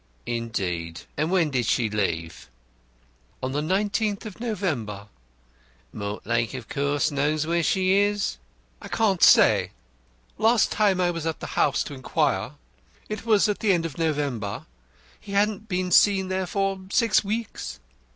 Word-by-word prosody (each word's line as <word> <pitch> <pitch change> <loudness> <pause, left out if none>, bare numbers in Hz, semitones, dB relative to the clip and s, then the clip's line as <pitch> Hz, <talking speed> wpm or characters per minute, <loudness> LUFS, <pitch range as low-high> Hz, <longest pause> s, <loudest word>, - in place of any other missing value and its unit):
"Indeed! 95 -8 -3
And 155 +2 0
when 175 -5 +2
did 125 -3 0
she 120 - +2
leave?" 85 - -3 0.9
"On 130 - -1
the 145 +2 -1
l9th 205 +5 0
of 215 -1 -8
November." 140 - -3 0.8
"Mortlake 110 +3 -2
of 125 -4 -7
course 145 +1 0
knows 150 +2 0
where 170 +1 +1
she 185 +2 +1
is?" 205 0 +1 0.4
"I - - -8
can't 200 -5 +1
say. - - +6 0.7
Last 225 +1 +3
time 200 -4 +2
I 175 -1 +2
was 165 -2 -4
at 160 - -3
the - - -6
house - - +2
to - - -8
inquire 130 -2 -1 0.6
it 215 +2 -5
was 215 -2 +4
at 210 - -1
the 210 -4 +3
end 170 -2 0
of 165 -1 -6
November 140 -10 -2 0.5
he 200 - -9
hadn't 210 +1 0
been 180 -1 -1
seen 190 +1 +4
there 190 -1 -1
for 195 0 -1
six 230 0 +3
weeks. 210 - -4
170 Hz, 150 wpm, -25 LUFS, 125-200 Hz, 0.9 s, say